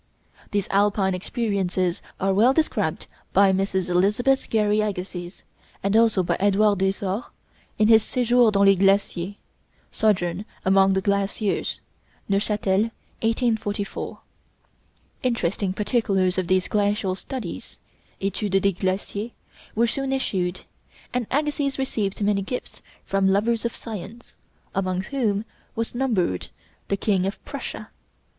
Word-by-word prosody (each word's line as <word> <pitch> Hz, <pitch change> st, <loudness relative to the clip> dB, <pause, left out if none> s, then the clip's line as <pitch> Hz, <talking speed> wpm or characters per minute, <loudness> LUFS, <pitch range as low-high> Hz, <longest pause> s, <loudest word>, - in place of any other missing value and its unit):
These 205 Hz, -2 st, -1 dB
Alpine 200 Hz, -1 st, +2 dB
experiences 185 Hz, -3 st, -1 dB, 0.2 s
are 195 Hz, +1 st, +2 dB
well 230 Hz, +7 st, +5 dB
described 315 Hz, +2 st, 0 dB, 0.3 s
by 195 Hz, -1 st, +6 dB
Mrs. 190 Hz, -1 st, 0 dB
Elizabeth 210 Hz, +9 st, +2 dB
Gary 210 Hz, -1 st, +2 dB
Agassiz, 185 Hz, -3 st, -5 dB, 0.4 s
and 200 Hz, +2 st, +1 dB
also 225 Hz, -4 st, +4 dB
by -, -, 0 dB
Edouard 205 Hz, 0 st, +3 dB
Desors 195 Hz, +3 st, -1 dB, 0.5 s
in 215 Hz, -, +4 dB
his 220 Hz, 0 st, +7 dB
'Séjours 245 Hz, -2 st, +3 dB
dans 200 Hz, 0 st, +4 dB
les 195 Hz, 0 st, +7 dB
Glaciers' 195 Hz, -1 st, +2 dB, 0.6 s
(Sojourn 185 Hz, -3 st, +1 dB, 0.2 s
among 195 Hz, 0 st, +5 dB
the 190 Hz, -, +1 dB
Glaciers: 200 Hz, +1 st, 0 dB, 0.5 s
Neufchâtel, 205 Hz, +1 st, +1 dB, 0.3 s
1844). 220 Hz, -3 st, -1 dB, 1.0 s
Interesting 205 Hz, -6 st, 0 dB
particulars 195 Hz, -3 st, +1 dB
of 185 Hz, -, -2 dB
these 185 Hz, 0 st, +2 dB
glacial 205 Hz, -2 st, +1 dB
studies 205 Hz, -1 st, -6 dB, 0.4 s
('Études 195 Hz, 0 st, 0 dB
des 200 Hz, +1 st, +2 dB
Glaciers') 195 Hz, +4 st, -3 dB, 0.4 s
were 230 Hz, +2 st, +4 dB
soon 270 Hz, +3 st, -2 dB
issued, 190 Hz, -9 st, -1 dB, 0.5 s
and 245 Hz, -3 st, -1 dB
Agassiz 290 Hz, -1 st, 0 dB
received 215 Hz, -7 st, -2 dB
many 200 Hz, -1 st, +2 dB
gifts 250 Hz, +6 st, -6 dB, 0.2 s
from 195 Hz, 0 st, +1 dB
lovers 220 Hz, +4 st, +1 dB
of 235 Hz, -, -2 dB
science, 220 Hz, +1 st, -8 dB, 0.4 s
among 185 Hz, -1 st, 0 dB
whom 215 Hz, -2 st, -1 dB, 0.3 s
was 230 Hz, 0 st, -2 dB
numbered 220 Hz, -, 0 dB, 0.4 s
the 200 Hz, -, 0 dB
King 195 Hz, -2 st, +1 dB
of 195 Hz, -, -3 dB
Prussia. -, -, -6 dB
200 Hz, 120 wpm, -24 LUFS, 190-225 Hz, 1.0 s, his